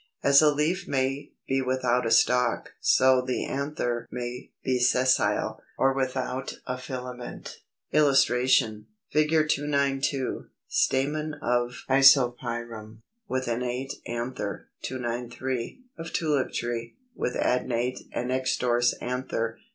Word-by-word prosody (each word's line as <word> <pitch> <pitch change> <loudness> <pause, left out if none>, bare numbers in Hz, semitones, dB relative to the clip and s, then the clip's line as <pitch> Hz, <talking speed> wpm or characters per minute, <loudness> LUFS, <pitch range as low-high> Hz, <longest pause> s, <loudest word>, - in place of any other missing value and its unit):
As 140 +1 +7
a 150 -1 +5
leaf 160 +6 0
may 135 +1 -1 0.2
be 135 0 +1
without 125 -2 +1
a - - +1
stalk, 120 +1 +2
so 130 -1 +4
the 125 0 -2
anther 135 -4 -2
may 125 0 -6
be 130 -1 +1
Sessile, 125 +1 +2 0.2
or 135 0 +3
without 130 0 -2
a 125 0 -4
filament. 125 -1 -7 0.3
[Illustration: 130 -6 +3 0.2
Fig. 155 0 +2 0.2
292. 140 -2 0 0.2
Stamen 150 +3 0
of 120 -2 -1
Isopyrum, 120 -5 +3 0.2
with 130 -4 -2
innate 125 +3 -2
anther. 120 -3 -4
293. 125 - -4 0.2
Of 165 - -6
Tulip 150 -5 0
tree, 120 0 -4 0.2
with 125 - -2
adnate 125 0 0
(and 125 +1 -3
extrorse) 125 -2 +1
anther. 120 -2 -3
130 Hz, 110 wpm, -27 LUFS, 120-135 Hz, 0.3 s, As